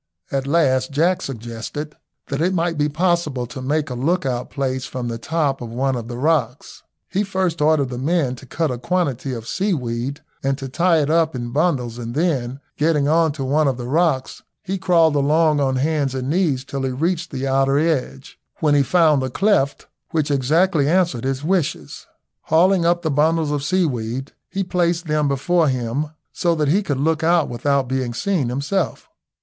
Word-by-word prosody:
At 135 0 -1
last 135 -4 +2
Jack 170 +6 +1
suggested 120 - -6 0.3
that 140 +1 -2
it 185 +3 +1
might 170 -1 0
be 150 0 +1
possible 155 -5 0
to 125 +3 -8
make 145 +2 -1
a - - -2
lookout 130 -2 -1
place 130 -2 -2
from 125 -2 -4
the 115 0 -4
top 145 -1 -1
of 120 - -6
one 130 +3 -1
of 115 -2 -5
the 120 0 -6
rocks. 145 -3 -1 0.3
He 195 - -1
first 185 -4 -1
ordered 150 -3 +3
the 125 -1 -5
men 140 -2 0
to 130 - -13
cut 160 +2 -1
a 125 - -4
quantity 145 -5 -1
of 115 -2 -6
seaweed 140 - -2 0.2
and 135 0 0
to 135 - -6
tie 170 +4 +2
it 145 - -1
up 160 -2 +2
in 120 -1 -4
bundles, 130 -6 0
and 120 +1 -6
then 135 -6 0 0.2
getting 150 -2 +2
on 160 +1 +3
to 140 -2 -5
one 145 +3 +2
of 130 -3 0
the 120 - -5
rocks 150 -2 0 0.2
he 195 0 -3
crawled 165 -4 +3
along 150 +2 +3
on 135 -2 +1
hands 140 -1 0
and 130 +1 -2
knees 155 -7 +1
till 140 0 -4
he 135 - -1
reached 165 +6 -1
the 135 0 -4
outer 135 +1 +2
edge, 150 -3 -2 0.2
when 150 -2 +2
he 145 - +5
found 155 -1 +3
a 130 - -2
cleft 170 - +1 0.2
which 155 -2 0
exactly 150 +3 +2
answered 170 -9 +1
his 135 +1 -2
wishes. 160 - -2 0.4
Hauling 175 +1 +3
up 175 0 +1
the 160 - 0
bundles 155 +2 +2
of 145 -2 -1
seaweed, 135 -7 -1 0.2
he 195 - -2
placed 175 -1 0
them 150 -1 +1
before 155 +5 +2
him, 130 +3 -1 0.3
so 170 -2 +1
that 150 -3 0
he 190 +7 +3
could 145 -9 -2
look 160 +2 +1
out 170 -1 +3
without 135 +2 0
being 130 -2 -2
seen 180 - 0
himself. 145 - -2
145 Hz, 190 wpm, -21 LUFS, 130-165 Hz, 0.4 s, he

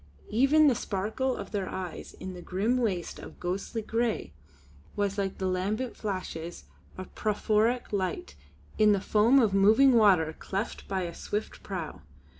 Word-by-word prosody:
Even 275 +7 +5
the 270 - +5
sparkle 220 +5 -2
of - - -7
their 200 -3 -2
eyes 185 -3 -6
in 185 0 -7
that 175 -1 -9
grim 205 +9 0
waste 190 -8 -2
of - - -11
ghostly 195 +5 -3
grey 225 - -1 0.6
was 200 0 -1
like 195 -1 -2
the 190 - -3
lambent 200 +7 -1
flashes 180 -5 -5 0.3
of 185 - -6
phosphoric 215 +3 +1
light 185 - -2 0.5
in 210 -1 +6
the 200 - +1
foam 220 +7 +4
of 225 -7 +4
moving 220 +7 +6
water 185 -9 +4
cleft 200 +4 -4
by 190 -2 -1
a 170 -1 -5
swift 210 +5 -4
prow. 180 -6 -6
205 Hz, 155 wpm, -28 LUFS, 185-225 Hz, 0.6 s, in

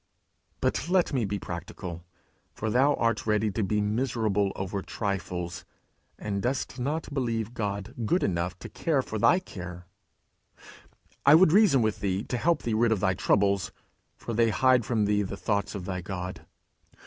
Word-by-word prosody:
But 165 - 0
let 180 -4 +2
me 125 -5 +1
be 100 +1 -2
practical; 85 -1 -7 0.5
for 110 0 -2
thou 135 +5 +4
art 115 -1 0
ready 105 0 +2
to 110 - -2
be 105 +2 +1
miserable 105 -2 0
over 95 +1 -3
trifles, 90 -4 -4 0.5
and 100 -2 -3
dost 130 +3 -2
not 150 +4 -2
believe 115 -4 -1
God 100 -3 -3
good 175 +12 +1
enough 85 0 -1
to - - -6
care 150 -6 0
for 110 - -4
thy 175 - +5
care: 90 - -8 1.4
I 140 +2 +8
would 165 -1 +6
reason 175 - +5
with 110 -1 0
thee 95 0 -1
to 125 - -3
help 165 +4 +1
thee 115 - -1
rid 115 +1 +3
of 110 - +2
thy 95 0 +2
troubles, 100 -2 +1 0.4
for 115 - -6
they 115 +1 +3
hide 125 +1 +3
from 110 -3 +1
thee 105 0 +2
the 100 0 -4
thoughts 100 +2 -1
of 95 -3 -5
thy 90 -1 -3
God. 90 0 -6
105 Hz, 170 wpm, -27 LUFS, 95-125 Hz, 1.4 s, I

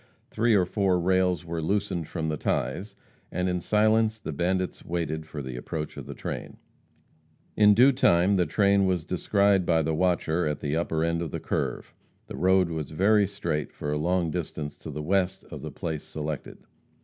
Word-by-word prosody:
Three 115 0 +3
or 95 -3 +4
four 95 -1 +1
rails 90 0 +1
were 85 -1 -3
loosened 95 -1 -1
from 80 - -3
the 80 - -1
ties, 100 +6 -2 0.4
and 90 0 -1
in 90 -1 -1
silence 110 +2 +2
the 80 - -5
bandits 90 +5 -1
waited 80 -2 -3
for 75 -2 -6
the 65 -1 -6
approach 75 +5 -5
of - - -8
the - - -7
train. - - -6 1.0
In 105 -1 +6
due 130 +5 +7
time 100 -7 +3
the 90 -3 +2
train 100 +3 +3
was 90 -4 0
descried 100 +1 +2
by 80 -2 +2
the 80 +1 0
watcher 85 -1 +1
at 75 -1 -2
the 75 +1 -2
upper 80 -1 0
end 85 0 0
of 85 - -3
the - - -4
curve - - -3 0.3
the - - -8
road 95 -1 +3
was 80 -4 -4
very 100 +5 +3
straight 85 -7 -3
for 75 - -5
a 75 - 0
long 85 +1 +1
distance 75 -3 -4
to - - -8
the 75 0 -5
west 95 +2 0
of - - -7
the - - -5
place 80 -3 -4
selected. 75 -1 -5
90 Hz, 190 wpm, -27 LUFS, 80-100 Hz, 1.0 s, due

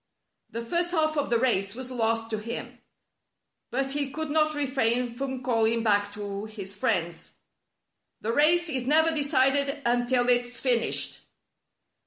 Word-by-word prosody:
" - - -53
The 230 0 -3
first 345 +7 0
half 310 -2 +2
of 290 -1 -1
the 235 - +3
race 210 -5 0
was 260 0 -6
lost 225 -2 -1
to 215 - -1
him; 230 +3 -6 0.9
but 270 +2 -1
he 285 -1 -2
could 315 +2 -4
not 310 0 +2
refrain 250 -4 0
from 265 0 -4
calling 230 -2 +1
back 205 -2 +2
to 205 0 -5
his 200 -3 -8
friends: 170 -4 -2 0.4
" - - -43
Tlie 225 +2 -1
race 340 +4 +4
is 260 -5 -2
never 320 +3 +4
decided 280 -1 +2
until 245 +1 +2
it's 245 0 +1
fin 250 -3 +2
ished." - - -2
245 Hz, 160 wpm, -27 LUFS, 225-285 Hz, 0.9 s, race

